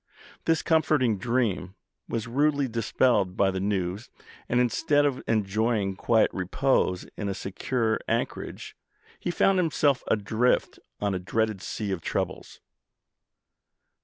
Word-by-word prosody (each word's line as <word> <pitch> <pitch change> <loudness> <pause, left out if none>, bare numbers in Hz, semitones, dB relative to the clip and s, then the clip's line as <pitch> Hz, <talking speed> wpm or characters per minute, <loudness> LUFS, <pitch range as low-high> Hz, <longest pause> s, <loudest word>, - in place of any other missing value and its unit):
This 165 -1 +2
comforting 150 - +2
dream 110 -6 -1 0.3
was 115 0 -2
rudely 140 +3 +1
dispelled 115 -4 +1
by 95 -1 +3
the 95 - -3
news, 95 +1 -2 0.4
and, 120 - +2
instead 145 +4 +2
of 140 -3 0
enjoying 110 -1 0
quiet 110 +3 +2
repose 95 0 0
in 100 - -3
a 95 - -2
secure 110 +4 -1
anchorage, - - -3 0.4
he - - -3
found 190 +2 +3
himself 150 -5 +2
adrift 110 +4 +1 0.2
on 100 -1 0
a 95 - -1
dreaded 110 +2 -1
sea 105 +1 -4
of 95 -3 -2
troubles. - - -4
110 Hz, 125 wpm, -27 LUFS, 95-130 Hz, 0.4 s, by